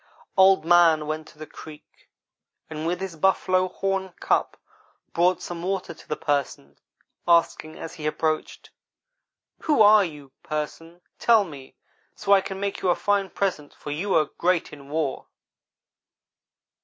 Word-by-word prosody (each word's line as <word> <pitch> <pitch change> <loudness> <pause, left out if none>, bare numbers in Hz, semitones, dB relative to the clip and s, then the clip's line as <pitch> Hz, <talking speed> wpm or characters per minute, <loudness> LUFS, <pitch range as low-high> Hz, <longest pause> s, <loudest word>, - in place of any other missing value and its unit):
"Old 190 -2 +5
man 165 -3 +5
went 155 +1 -4
to - - -18
the 155 - -8
creek, 150 -1 -14 0.6
and 155 +1 -4
with 175 +1 -1
his 190 -3 -5
buffalo 185 +2 +2
horn 195 0 -3
cup - - 0 0.6
brought 180 +2 +2
some 175 -1 -6
water 185 -1 -3
to - - -18
the 150 - -1
Person, 140 - -3 0.5
asking 170 -2 +2
as 165 - -8
he 155 -1 -5
approached: 155 0 -2 0.9
"'Who 295 -8 +4
are 210 0 +7
you, 150 -6 -8
Person? 165 +3 -6 0.2
Tell 225 -3 +5
me, 140 -7 -11 0.4
so 200 - -3
I 200 -1 +7
can 190 0 -6
make 200 0 -3
you 185 - +1
a 175 - +4
fine 200 -1 0
present, 180 -8 -3
for 145 - -8
you 185 +7 -1
are 155 -2 +4
great 175 -2 +1
in 140 -1 -12
war.' 150 -2 -2
170 Hz, 150 wpm, -24 LUFS, 155-190 Hz, 0.9 s, are